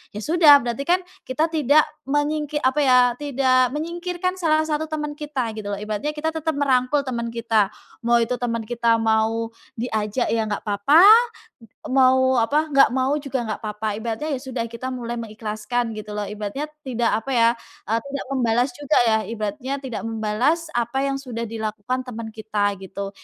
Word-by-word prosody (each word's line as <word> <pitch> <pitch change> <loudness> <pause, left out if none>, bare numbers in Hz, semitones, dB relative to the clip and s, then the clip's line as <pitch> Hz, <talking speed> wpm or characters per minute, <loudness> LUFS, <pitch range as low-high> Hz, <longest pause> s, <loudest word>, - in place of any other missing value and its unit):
ya - - -4
sudah 315 -3 +7
berarti 240 +2 -3
kan 355 +1 +4 0.3
kita 280 +5 +1
tidak 305 -1 +4 0.3
mengingkir 295 +1 0
apa 260 +3 +2
ya, 255 -3 +5 0.2
tidak 255 -3 +2
menyingkirkan 345 +3 -3
salah 315 -3 +2
1 315 0 -1
teman 300 -1 -3
kita 280 -6 -3
gitu 215 -1 -7
loh, - - -3
ibaratnya 215 +8 -3
kita 315 +1 -1
tetap 320 -1 -2
merangkul 275 0 +2
teman 235 -3 -3
kita, 225 -3 +1 0.4
mau 235 0 +4
itu 230 +2 0
teman 230 -2 -2
kita 235 0 +2
mau 225 +1 +1 0.3
diajak 220 0 -1
ya 230 - +1
nggak 205 - -3
papa, 210 - +5 0.9
mau, 260 0 +4
apa 295 +7 +1
nggak 275 -2 +5
mau 265 +2 +1
juga 275 -3 -3
nggak 215 - -4
papa. 215 0 -4
Ibaratnya 230 +7 -3
ya - - -9
sudah 255 -3 -3
kita 235 +3 -6
mulai 240 -1 -4
mengikhlaskan 220 +1 -3
gitu 210 0 -7
loh 210 0 -3
ibaratnya 210 +7 -4 0.2
tidak 240 -2 0
apa 270 - -5
ya, 230 -1 +5 0.4
eee, 225 +1 +2
tidak 280 - -4
membalas 245 -1 +1
juga 290 +2 0
ya, 220 -1 +4
ibaratnya 230 +5 -4
tidak 260 -4 -5
membalas 225 +9 0
apa 240 +3 -1
yang 275 0 -1
sudah 250 -4 -5
dilakukan 220 +3 -3
teman 230 -3 -6
kita 210 -2 -1
gitu. 195 +1 -6
245 Hz, 170 wpm, -22 LUFS, 225-285 Hz, 0.9 s, sudah